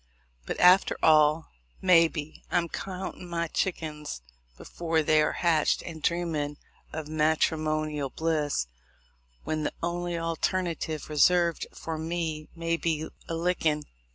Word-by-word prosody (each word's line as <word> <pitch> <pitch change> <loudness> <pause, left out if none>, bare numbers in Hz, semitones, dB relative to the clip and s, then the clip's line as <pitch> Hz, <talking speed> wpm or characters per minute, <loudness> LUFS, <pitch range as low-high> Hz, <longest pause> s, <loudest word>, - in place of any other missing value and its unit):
But, - - -3
after 180 +2 +6
all, 155 0 +4 0.3
maybe 165 -4 +3
I'm 170 -1 +1
countin' 185 -1 -6
my 170 0 -1
chickins 155 - -3 0.4
before 165 -2 -1
they 155 0 +4
are 150 - +2
hatched, 165 -3 +2
and 160 -2 -8
dreamin' 155 -3 -1 0.3
of 155 -1 -5
matrimonial 155 -1 0
bliss 150 - 0 0.8
when 155 0 -2
the - - -2
only 175 0 -2
alternative 165 -1 -2
reserved 170 +3 +3
for 160 -1 -5
me 160 -2 -3
may 165 0 -1
be 160 -2 -1 0.2
a 165 - -1
lickin'. 165 -3 +1
160 Hz, 120 wpm, -28 LUFS, 155-170 Hz, 0.8 s, after